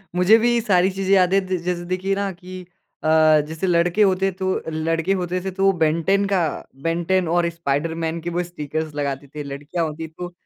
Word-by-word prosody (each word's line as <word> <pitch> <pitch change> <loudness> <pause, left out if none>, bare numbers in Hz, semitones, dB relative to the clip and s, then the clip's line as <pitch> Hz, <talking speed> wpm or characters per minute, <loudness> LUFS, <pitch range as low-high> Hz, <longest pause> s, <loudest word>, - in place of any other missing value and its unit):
मुझे 185 +5 +6
भी 240 +1 +2
सारी 190 -3 +3
चीज़ें 195 +1 0
याद 185 0 +3
है 195 - +5
द 185 -1 -2
जैसे 175 -1 -2
देखिए 185 +2 -1
ना 200 -1 -2
कि 185 +1 -10 0.4
अ, - - -1 0.4
जैसे 160 +4 -3
लड़के 175 +4 +2
होते 190 0 +2
तो 190 0 -2
लड़के 165 +3 0
होते 180 +1 -2
थे 190 - -2
तो 195 +1 +2
बेन 160 +2 +2
10 200 +1 +3
का 190 - +3 0.4
बेन 165 +1 0
10 185 -3 +2
और 170 -1 +2
स्पाइडरमैन 165 +1 -2
के 175 - -4
वो 175 +1 -1
स्टिकर्स 155 -2 -5
लगाते 140 -1 -3
थे। 150 - -4
लड़कियाँ 145 +5 -4
होती 160 +1 -5
तो 175 +3 -8
175 Hz, 200 wpm, -22 LUFS, 160-190 Hz, 0.4 s, मुझे